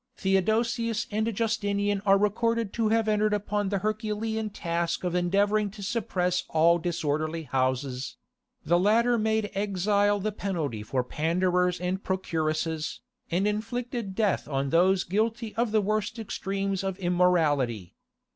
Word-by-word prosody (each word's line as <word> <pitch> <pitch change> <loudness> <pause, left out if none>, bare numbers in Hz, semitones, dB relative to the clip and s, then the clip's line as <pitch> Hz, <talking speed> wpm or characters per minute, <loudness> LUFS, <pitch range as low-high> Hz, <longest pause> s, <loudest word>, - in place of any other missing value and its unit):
Theodosius 225 +4 +1
and 220 +2 0
Justinian 205 -2 0
are 195 0 +6
recorded 225 +1 0
to 225 -2 +1
have 225 0 +2
entered 210 0 +2
upon 205 0 -1
the 200 - 0
herculean 215 +1 -2
task 170 -4 -2
of 180 -1 -1
endeavouring 200 +4 +2
to 200 0 -10
suppress 180 -4 -1
all 170 +2 +4
disorderly 160 -1 -2
houses: 130 -1 -2 0.5
the 175 +3 +3
latter 230 +5 +3
made 220 -1 0
exile 205 +1 +1
the 215 +2 -1
penalty 165 - -3
for 125 +4 -1
panders 180 +5 +1
and 180 +2 -2
procuresses, 160 -3 -2 0.3
and 185 +4 +1
inflicted 225 0 -3
death 210 -2 +1
on 135 -1 -1
those 185 +3 +4
guilty 220 +4 -1
of 230 -1 0
the 215 -1 +3
worst 215 +2 -1
extremes 195 -3 -3
of 190 -1 -2
immorality. 160 - +1
195 Hz, 135 wpm, -27 LUFS, 170-215 Hz, 0.5 s, are